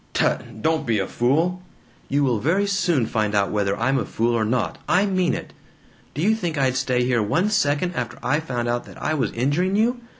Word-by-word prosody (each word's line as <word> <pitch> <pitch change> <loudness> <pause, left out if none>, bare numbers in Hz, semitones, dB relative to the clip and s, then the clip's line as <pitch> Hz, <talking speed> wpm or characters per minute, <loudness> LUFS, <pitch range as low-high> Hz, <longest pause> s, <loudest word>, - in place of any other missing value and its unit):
"Tut! 110 - -1
Don't 160 -3 +1
be 115 -2 +2
a 95 - 0
fool!" 160 - 0 0.5
"You 145 +1 +2
will 125 -5 +1
very 180 - +1
soon 180 - +1
find 105 -2 -1
out 100 -1 +2
whether 100 -1 0
I'm 135 +3 +2
a - - -2
fool 115 +1 0
or 115 -2 +1
not! 110 -5 -1
I 190 +3 +4
mean 185 -3 +1
it! - - -7 0.6
Do 150 - -2
you 215 +3 +4
think 175 -8 -3
I'd 130 -2 +1
stay 130 -1 +1
here 125 -2 +1
one 170 - +1
second 175 -2 +1
after 125 -7 -4
I 150 +3 +1
found 125 -7 -3
out 120 0 -1
that - - -13
I 155 - -1
was 150 - 0
injuring 145 +11 0
you? 240 +3 +1
135 Hz, 220 wpm, -23 LUFS, 120-180 Hz, 0.6 s, I